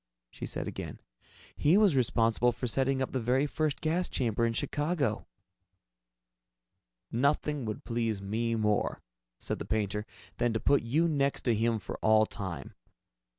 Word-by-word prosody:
she - - -6
said - - -3
again. - - -6 0.6
"He 160 +6 +4
was 205 -8 +5
responsible 120 -1 +3
for 120 +2 -5
setting 135 +2 +1
up - - -4
the 130 - -1
very 125 +4 +2
first 150 0 -1
gas 170 +3 0
chamber 115 -2 +1
in 115 - -1
Chicago." 145 -2 -1 1.8
"Nothing 140 +2 +1
would 110 -1 -4
please 115 -3 -1
me 115 +4 -1
more," 105 -2 0 0.3
said - - -4
the - - -3
painter, 105 0 -1 0.3
"than 120 -1 +1
to 115 - 0
put 140 - +3
you 150 +9 +2
next 140 -3 +1
to 120 - +2
him 115 +1 +1
for 105 - -6
all 110 0 +5
time. 95 -5 -6
120 Hz, 150 wpm, -30 LUFS, 110-140 Hz, 1.8 s, was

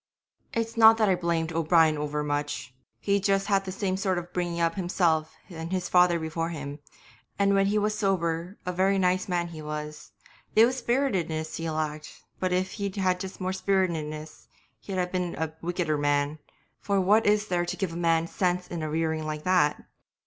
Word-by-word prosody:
'It's 230 0 -2
not 225 0 +8
that 215 -2 +3
I - - +5
blamed 170 -2 -1
O'Brien 160 -1 +4
over 150 0 -2
much, 145 -3 -3 0.3
he'd 200 -1 +1
just 195 -1 +2
had 195 -1 +1
the 190 - -4
same 190 0 -1
sort 190 -2 0
of 175 0 -6
bringing 175 -1 -2
up 165 0 +2
himself 170 -4 0
and 165 -2 -7
his 185 -1 -2
father 180 -1 +5
before 165 +1 -3
him, 145 -3 -6 0.6
and 200 0 +3
when 195 0 +3
he 210 +1 +1
was 210 0 +1
sober 180 -2 -1
a 180 - -1
very 190 +2 +2
nice 185 +2 +1
man 175 -1 0
he 160 -2 -8
was; 150 0 -6 0.4
it 220 - +8
was 255 +2 0
spiritiness 190 - -1
he 165 0 -3
lacked; 155 -1 -4 0.2
but 185 -1 0
if 185 +1 0
he'd 200 -1 -2
had 185 -2 0 0.2
more 185 0 -2
spiritiness 165 -6 -2 0.3
he'd 195 -2 -6
have 180 -1 -1
been 180 -2 -2
a 160 -1 -2
wickeder 170 -3 -1
man, 145 +1 +1 0.4
for 200 -1 0
what 205 +4 +4
is 210 0 +3
there 175 -1 +1
to 175 - -4
give 185 -4 -2
a - - -7
man 165 -1 +2
sense 180 +1 -1
in 170 -2 -5
a 155 - -3
rearing 160 0 -1
like 155 0 -4
that? 180 -5 +2
175 Hz, 190 wpm, -27 LUFS, 160-195 Hz, 0.6 s, not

